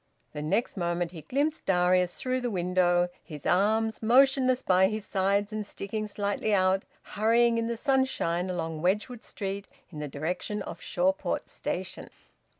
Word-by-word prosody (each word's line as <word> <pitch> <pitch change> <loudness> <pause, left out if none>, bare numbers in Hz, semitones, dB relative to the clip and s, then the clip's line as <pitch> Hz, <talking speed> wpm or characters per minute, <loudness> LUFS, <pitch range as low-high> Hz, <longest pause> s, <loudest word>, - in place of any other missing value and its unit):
The 150 - -5
next 200 +10 -1
moment 175 -1 -1
he 165 -3 -9
glimpsed 290 - -1
Darius 180 -1 +2
through 255 0 -1
the 245 - -1
window, 180 -2 +2
his 150 -3 -10
arms 220 +4 +2
motionless 255 +2 +4
by 185 0 +4
his 215 0 -4
sides 200 +2 0
and 215 0 -2
sticking 210 +1 -5
slightly 205 +1 0
out; 190 0 +2 0.2
hurrying 230 +2 +2
in 230 - -1
the 235 0 -2
sunshine 250 - +1
along 165 -3 -3
Wedgwood 210 +7 0
Street 200 0 -5 0.2
in 155 - -8
the 150 - -3
direction 180 +8 -3
of 170 - -8
Shawport 185 +2 -1
station. - - -5
195 Hz, 150 wpm, -28 LUFS, 180-225 Hz, 0.2 s, motionless